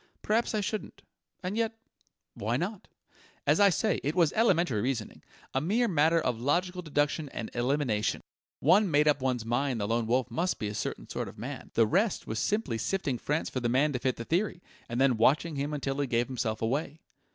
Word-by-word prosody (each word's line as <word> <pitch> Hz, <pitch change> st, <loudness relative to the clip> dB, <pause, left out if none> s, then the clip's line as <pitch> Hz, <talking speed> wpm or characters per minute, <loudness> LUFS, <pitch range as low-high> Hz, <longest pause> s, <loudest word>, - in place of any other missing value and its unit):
"Perhaps 220 Hz, +1 st, +1 dB
I 210 Hz, -, +1 dB
shouldn't. 210 Hz, +1 st, -4 dB, 0.4 s
And 185 Hz, +3 st, -2 dB
yet 225 Hz, 0 st, -1 dB, 0.6 s
why 115 Hz, +4 st, -1 dB
not? 190 Hz, +6 st, -4 dB, 0.6 s
As -, -, +3 dB
I 200 Hz, -1 st, +7 dB
say, 200 Hz, +4 st, +1 dB
it 145 Hz, +4 st, -1 dB
was 170 Hz, -5 st, +3 dB
elementary 175 Hz, -, +2 dB
reasoning 120 Hz, -2 st, -3 dB, 0.3 s
a 130 Hz, -, +1 dB
mere 220 Hz, -, +2 dB
matter 165 Hz, -2 st, +3 dB
of 125 Hz, -7 st, -1 dB
logical 180 Hz, +7 st, 0 dB
deduction 145 Hz, -1 st, 0 dB
and 115 Hz, -4 st, -6 dB
elimination. 120 Hz, -3 st, 0 dB, 0.4 s
One 200 Hz, +1 st, +5 dB
made 150 Hz, -1 st, +3 dB
up 145 Hz, -2 st, +3 dB
one's 125 Hz, -3 st, -1 dB
mind 120 Hz, +1 st, 0 dB
the 100 Hz, -, -1 dB
Lone 115 Hz, 0 st, 0 dB
Wolf 125 Hz, +1 st, +1 dB
must 175 Hz, +9 st, 0 dB
be 105 Hz, -, -3 dB
a -, -, -5 dB
certain 105 Hz, -, -4 dB
sort -, -, -4 dB
of -, -, -11 dB
man; -, -, -7 dB
the 115 Hz, -, +5 dB
rest 195 Hz, -, +1 dB
was 110 Hz, -, -3 dB
simply 205 Hz, -, 0 dB
sifting 140 Hz, -, -1 dB
France 150 Hz, +2 st, -1 dB
for 130 Hz, -, -2 dB
the 120 Hz, -1 st, -1 dB
man 140 Hz, +4 st, +2 dB
to 125 Hz, -, -1 dB
fit 130 Hz, 0 st, 0 dB
the 115 Hz, -, -7 dB
theory, 180 Hz, -, -1 dB, 0.3 s
and 120 Hz, +1 st, -2 dB
then 135 Hz, -3 st, +4 dB
watching 150 Hz, +7 st, +3 dB
him 140 Hz, +2 st, -2 dB
until 140 Hz, -2 st, -2 dB
he 140 Hz, -, 0 dB
gave 120 Hz, -1 st, +1 dB
himself 115 Hz, -4 st, -3 dB
away." 145 Hz, +6 st, -2 dB
145 Hz, 205 wpm, -29 LUFS, 120-180 Hz, 0.6 s, I